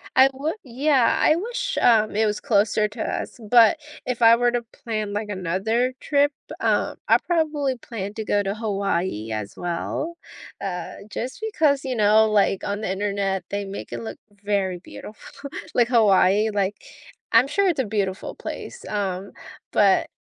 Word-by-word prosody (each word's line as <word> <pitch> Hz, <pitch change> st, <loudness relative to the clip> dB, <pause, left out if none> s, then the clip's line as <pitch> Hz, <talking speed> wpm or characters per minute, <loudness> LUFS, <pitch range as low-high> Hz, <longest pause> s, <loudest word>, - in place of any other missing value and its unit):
I 265 Hz, +1 st, +7 dB
would 295 Hz, +7 st, -3 dB
yeah. 270 Hz, +2 st, +2 dB
I 310 Hz, -, +5 dB
wish, 485 Hz, +7 st, -3 dB
um, 215 Hz, -3 st, +4 dB
it 220 Hz, -, +3 dB
was 210 Hz, -1 st, -1 dB
closer 210 Hz, 0 st, +2 dB
to 215 Hz, +1 st, -8 dB
us, -, -, -4 dB
but 235 Hz, +5 st, +7 dB, 0.3 s
if 250 Hz, -1 st, -3 dB
I 230 Hz, 0 st, +8 dB
were 240 Hz, 0 st, +2 dB
to 240 Hz, 0 st, -1 dB, 0.2 s
plan, 215 Hz, -3 st, -2 dB
like, 210 Hz, 0 st, -3 dB
another 205 Hz, +7 st, -1 dB
trip, 285 Hz, 0 st, +2 dB, 0.3 s
uh, -, -, +1 dB
I -, -, +6 dB
probably 300 Hz, -6 st, 0 dB
plan 210 Hz, -4 st, -6 dB
to 220 Hz, -, -4 dB
go 205 Hz, -, +2 dB
to 195 Hz, +1 st, -2 dB
Hawaii 195 Hz, -, -2 dB
as 105 Hz, -2 st, -4 dB
well, 175 Hz, -, -3 dB, 0.4 s
uh, 180 Hz, -3 st, -4 dB, 0.2 s
just 250 Hz, +2 st, -5 dB
because, 285 Hz, -6 st, +2 dB
you 260 Hz, -1 st, -2 dB
know, 215 Hz, 0 st, +5 dB
like, 200 Hz, -2 st, +2 dB
on 205 Hz, +1 st, -3 dB
the 215 Hz, -, -2 dB
Internet, 195 Hz, -1 st, -1 dB
they 200 Hz, 0 st, -3 dB
make 195 Hz, -, -7 dB
it 120 Hz, -1 st, -5 dB
look 110 Hz, 0 st, -7 dB, 0.3 s
very 195 Hz, -3 st, 0 dB
beautiful. 215 Hz, +9 st, -11 dB, 0.2 s
Like 240 Hz, -2 st, +3 dB
Hawaii, 210 Hz, -2 st, +4 dB
like, 200 Hz, -1 st, 0 dB, 0.6 s
I'm 265 Hz, -, +5 dB
sure 395 Hz, +7 st, +1 dB
it's 335 Hz, -7 st, +1 dB
a -, -, +3 dB
beautiful 200 Hz, -3 st, -2 dB
place, 485 Hz, -, -8 dB
um, 195 Hz, -2 st, -3 dB, 0.4 s
but, 200 Hz, -2 st, +3 dB
215 Hz, 165 wpm, -23 LUFS, 195-255 Hz, 0.6 s, I